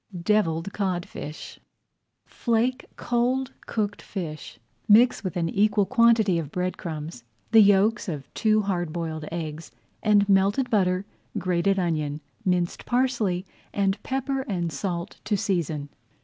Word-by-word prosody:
DEVILLED 175 -2 +1
CODFISH 175 -6 -4 0.7
Flake 240 +2 0
cold 250 +2 0
cooked 205 -2 -2
fish. 160 -6 -6 0.3
Mix 230 +3 +5
with 185 -3 -3
an 170 -1 0
equal 205 +3 +2
quantity 230 -6 +4
of 155 -4 -5
bread 180 +2 -2
crumbs 155 -6 -6 0.3
the 225 - +8
yolks 205 +2 +4
of 145 -5 -6
two 215 -1 +2
hard 175 -5 -1
boiled 160 -2 -4
eggs, 160 -1 -5 0.3
and 205 -2 +4
melted 200 +6 +3
butter, 185 -3 +2 0.3
grated 185 +1 +1
onion, 155 -5 -1 0.2
minced 180 -3 -1
parsley, 240 -8 +1 0.3
and 195 0 +1
pepper 270 0 -2
and 175 -4 -1
salt 170 +3 -4
to 210 - 0
season. 160 -7 -1
195 Hz, 125 wpm, -25 LUFS, 170-215 Hz, 0.7 s, the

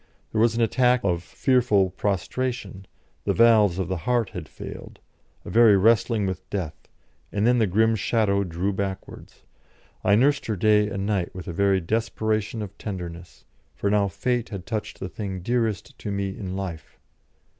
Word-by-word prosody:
There 110 - +1
was 115 0 +3
an 115 - +2
attack 125 +2 +3
of 85 -3 0
fearful 110 -5 +2
prostration 100 +1 -3 0.4
the - - +1
valves 110 -6 +5
of 95 -3 -1
the 95 0 -2
heart 120 -4 +1
had 80 -5 -7
failed - - -9 0.5
a - - -6
very 115 -3 +6
wrestling 110 +1 +3
with 95 -1 -5
Death, 85 -7 -3 0.6
and 105 +1 0
then 125 +1 +4
the 110 - +3
grim 110 +4 +3
shadow 105 -2 +1
drew 90 +2 -2
backwards. 95 0 -6 0.6
I 100 - +4
nursed 140 +6 +2
her 110 - -1
day 105 +2 +3
and 100 -1 -3
night 100 -5 -1
with 95 - -8
a 85 - -4
very 100 +2 +2
desperation 110 +2 -1
of 100 -1 -9
tenderness, 90 -4 -7 0.3
for 100 - -1
now 105 -1 +3
Fate 120 +5 -1
had 100 -5 -7
touched 110 0 -4
the 95 - -4
thing 95 0 -5
dearest 115 +4 -1
to 105 - -5
me 100 0 -1
in 95 -2 -5
life. 95 -5 -6
100 Hz, 170 wpm, -25 LUFS, 95-115 Hz, 0.6 s, very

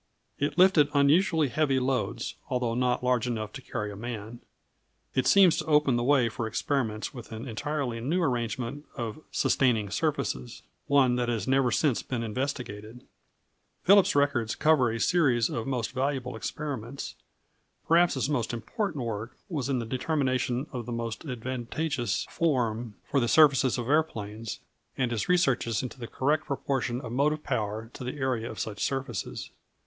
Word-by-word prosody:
It 145 +2 -1
lifted 180 -6 +6
unusually 155 +2 +4
heavy 140 -2 +2
loads, 125 -3 -1 0.2
although 125 -3 0
not 125 +1 +1
large 125 -1 +2
enough 110 -3 -3
to 135 - -7
carry 105 -4 -4
a - - -8
man. 115 +1 -6 0.7
It 130 - +1
seems 190 -4 +6
to - - -2
open 150 -4 +3
the 120 - +1
way 130 -2 +4
for 115 0 -3
experiments 110 -2 -1
with 120 -4 -10
an 115 +4 -6
entirely 130 0 -2
new 155 +10 0
arrangement 125 +1 -2
of 115 +2 -4
sustaining 115 -7 +2
surfaces 115 - -2 0.2
one 130 -3 +4
that 120 -1 0
has 110 -4 -2
never 135 -1 +3
since 130 +1 +1
been 120 -3 -3
investigated. 120 -2 -4 0.8
Phillips's 200 -3 +6
records 140 -6 +2
cover 155 -6 +4
a 115 - -3
series 125 -8 +3
of 115 +1 -3
most 125 -4 -1
valuable 130 -1 -2
experiments. 135 0 -5 0.7
Perhaps 170 0 +4
his 130 - 0
most 125 -6 -1
important 135 - -3
work 110 +1 -5
was 140 -7 -2
in 135 - +1
the 120 - -2
determination 130 0 0
of 120 -3 -5
the - - -4
most 115 +2 -4
advantageous 125 -2 -2
form 120 -8 0
for 140 - 0
the 120 - +1
surfaces 135 -3 +5
of 120 -1 -3
aeroplanes, 115 -8 -1 0.4
and 130 -2 0
his 115 - -2
researches 135 - +2
into 130 +1 -7
the 120 - -6
correct 145 +6 0
proportion 135 -3 -1
of 125 - -7
motive 150 +4 +1
power 110 -3 -2
to - - -8
the 125 +3 -4
area 130 -4 -1
of 110 - -8
such 105 +2 -3
surfaces. 130 -7 -3
125 Hz, 160 wpm, -28 LUFS, 115-145 Hz, 0.8 s, lifted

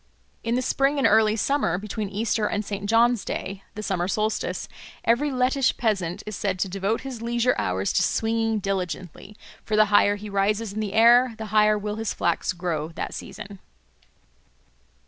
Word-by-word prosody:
In 230 +1 0
the 255 - 0
spring 275 +3 +1
and 275 - +1
early 215 0 +4
summer, 225 - +1
between 210 +1 -4
Easter 210 +1 0
and 210 0 -2
St. 200 0 -4
John's 235 0 +3
Day 195 0 -5
(the 215 - -5
summer 180 -4 -1
solstice), 215 +2 -2 0.4
every 245 +6 +2
Lettish 255 +1 +1
peasant 200 -5 -1
is 215 -1 -5
said 190 -1 -2
to 190 - -1
devote 195 +4 -1
his 260 -4 -7
leisure 240 +1 +1
hours 95 +2 -1
to - - +3
swinging 225 0 0
diligently; 190 0 -4 0.3
for 215 - -1
the 215 0 +6
higher 205 0 +5
he 205 +1 -8
rises 200 +1 0
in 215 - -4
the 210 -2 -3
air 235 +2 +6
the 220 - -5
higher 215 0 +5
will 210 +1 -4
his 225 -2 -3
flax 170 - 0
grow 170 -4 -3
that - - -4
season. 200 -1 -9
215 Hz, 175 wpm, -24 LUFS, 195-230 Hz, 0.4 s, the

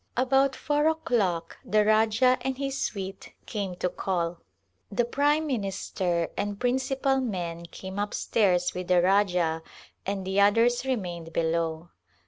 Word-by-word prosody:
About 270 +1 +3
four 295 +1 +1
o'clock 225 - 0
the 210 +1 +2
Rajah 220 +4 +4
and 265 -1 -2
his 275 0 -2
suite 195 -1 -4
came 200 -5 -3
to 180 - -1
call. 175 -2 -2 0.5
The 235 +4 +1
prime 290 +5 +2
minister 190 - -1
and 205 -1 -3
principal 265 +2 +1
men 170 -7 -4
came 190 +3 -7
up 205 0 -2
stairs 180 -5 +2
with 180 0 -5
the 180 -1 +4
Rajah 180 -4 +2 0.4
and 195 -1 -3
the 190 +1 +2
others 230 +5 +3
remained 175 -9 -3
be 170 - +1
low. 165 0 -1
200 Hz, 140 wpm, -27 LUFS, 180-250 Hz, 0.5 s, Rajah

